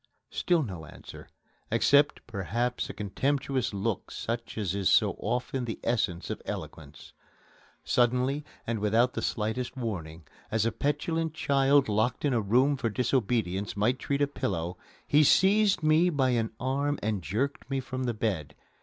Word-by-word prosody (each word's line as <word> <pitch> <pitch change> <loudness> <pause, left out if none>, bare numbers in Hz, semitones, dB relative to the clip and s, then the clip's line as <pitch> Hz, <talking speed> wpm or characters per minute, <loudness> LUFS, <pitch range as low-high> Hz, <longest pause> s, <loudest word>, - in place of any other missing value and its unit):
Still 175 -3 +1
no 90 - -7
answer, - - -12 0.4
except 145 +1 +3
perhaps 120 +3 -2
a - - -5
contemptuous 130 +5 -1
look 100 +1 -2
such 115 0 -4
as 100 -5 -1
is 100 -2 +1
so - - +4
often 125 +3 -2
the 115 - -5
essence 95 -7 -1
of - - -5
eloquence. 80 -1 -8 0.7
Suddenly, 125 +4 +1 0.2
and 115 -1 -2
without 115 +4 +2
the - - -3
slightest 120 +4 -2
warning, 85 -9 -5 0.2
as 110 0 +1
a 115 - +2
petulant 155 +4 -1
child 140 -2 +3
locked 110 +7 0
in 140 - +2
a 115 - +2
room 130 +8 +3
for 115 - -1
disobedience 110 -5 0
might 120 +6 +1
treat 140 0 0
a - - +2
pillow, 90 -10 -3 0.3
he 150 +1 +5
seized 195 +3 +4
me 155 +3 +4
by 135 -5 +1
an 115 -2 +1
arm 140 +3 0
and 105 -2 -1
jerked 115 - -2
me 135 -1 0
from 130 0 -4
the 120 - 0
bed. 100 -9 -2
120 Hz, 155 wpm, -28 LUFS, 105-140 Hz, 0.7 s, he